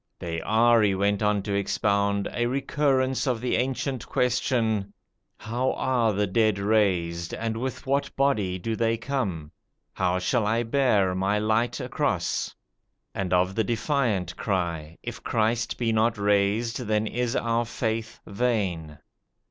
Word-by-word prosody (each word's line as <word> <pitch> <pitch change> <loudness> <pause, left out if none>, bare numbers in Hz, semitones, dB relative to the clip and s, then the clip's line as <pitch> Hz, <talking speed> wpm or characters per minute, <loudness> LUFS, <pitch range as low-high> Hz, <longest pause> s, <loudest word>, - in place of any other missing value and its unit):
They 85 -1 -4
are, 115 +4 +4
he 100 -2 +3
went 100 +1 +1
on 105 -1 +1
to 100 - -3
expound, 100 0 +1
a 120 0 0
recurrence 135 0 +1
of 125 -3 +1
the 125 +2 0
ancient 130 +1 -2
question: 115 -5 0 0.4
"How 120 +4 -1
are 120 -4 +1
the 105 0 +1
dead 110 +1 +2
raised, 95 -5 +1
and 115 -1 -3
with 130 +2 -4
what 140 +1 0
body 110 -10 +1
do 110 +5 -3
they 115 0 +1
come?" 100 - -3 0.4
"How 90 -1 0
shall 110 +3 0
I 115 +2 +1
bear 115 -7 +2
my 95 +3 +1
light 110 +3 +1
across?" - - -1 0.6
and 95 -2 -3
of 90 +1 +2
the 110 - +1
defiant 110 - 0
cry: 85 -5 -2
"If - - -6
Christ 115 +1 0
be 115 -2 0
not 110 +1 +2
raised, 105 +4 +1
then 110 -3 0
is 120 +2 -2
our 115 0 +1
faith 110 -1 -3
vain." 100 -9 -1
110 Hz, 145 wpm, -26 LUFS, 100-120 Hz, 0.6 s, are